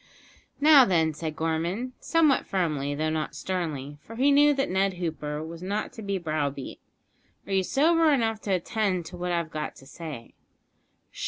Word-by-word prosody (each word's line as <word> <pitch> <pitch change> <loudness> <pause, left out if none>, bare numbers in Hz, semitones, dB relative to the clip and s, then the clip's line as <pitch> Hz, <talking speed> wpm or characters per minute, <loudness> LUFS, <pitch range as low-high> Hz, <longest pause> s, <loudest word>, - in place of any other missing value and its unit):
"Now, 290 -2 +8
then," 165 -7 +2
said 155 0 -5
Gorman, 170 +11 -2
somewhat 315 -5 +2
firmly, 150 -7 -1
though 155 +1 -1
not 155 -1 -3
sternly, 150 -6 -4
for 225 +9 -11
he 270 +4 +3
knew 290 +1 +6
that 275 0 0
Ned 190 0 +1
Hooper 155 -3 -4
was 165 +1 -8
not 200 +3 -3
to 225 - -9
be 200 -2 -2
browbeat; 150 -5 -3 0.7
"are 200 - -4
you 190 - +3
sober 320 - +3
enough 225 -5 +1
to 200 - -3
attend 185 -1 -1
to 175 - -9
what 180 0 -2
I've 170 -2 -1
got 155 -1 -4
to 135 - -15
say?" 145 -4 -9
180 Hz, 170 wpm, -27 LUFS, 155-225 Hz, 0.7 s, Now